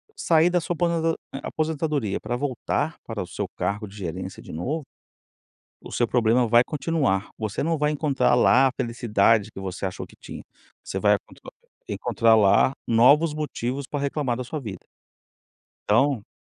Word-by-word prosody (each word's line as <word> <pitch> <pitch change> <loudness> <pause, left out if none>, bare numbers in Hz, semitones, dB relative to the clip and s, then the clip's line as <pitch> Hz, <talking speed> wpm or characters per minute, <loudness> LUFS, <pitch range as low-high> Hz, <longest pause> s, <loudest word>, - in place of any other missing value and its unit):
sair 165 +1 +3
da 175 0 +2
sua 175 - -2
aposen 165 -1 +1 0.3
aposentadoria 155 -8 -2
para 120 - -3
voltar 130 -1 -2
para - - -4
o - - -10
seu - - -4
cargo 100 +4 -2
de 100 - -14
gerência 95 0 -6
de - - -10
novo, 140 - -3 1.0
o - - -10
seu 120 - +1
problema 120 0 +2
vai 120 +2 +5
continuar, 140 - -1
você 110 -2 -3
não 165 0 0
vai 150 +1 +1
encontrar 140 -4 +2
lá 130 +2 +5
a - - -1
felicidade 115 -3 +2
que 95 - -9
você 95 0 -5
achou 95 - -4
que - - -19
tinha, - - -10 0.4
você - - -4
vai - - +4 0.7
encontrar 115 -1 +2
lá 105 +4 +4 0.2
novos 145 +7 +5
motivos 140 -3 -3
para 145 - -3
reclamar 140 -3 -1
da 125 - -3
sua 150 +5 -5
vida. 100 -8 -8 1.0
Então 115 +1 +2
125 Hz, 160 wpm, -24 LUFS, 110-150 Hz, 1.0 s, vai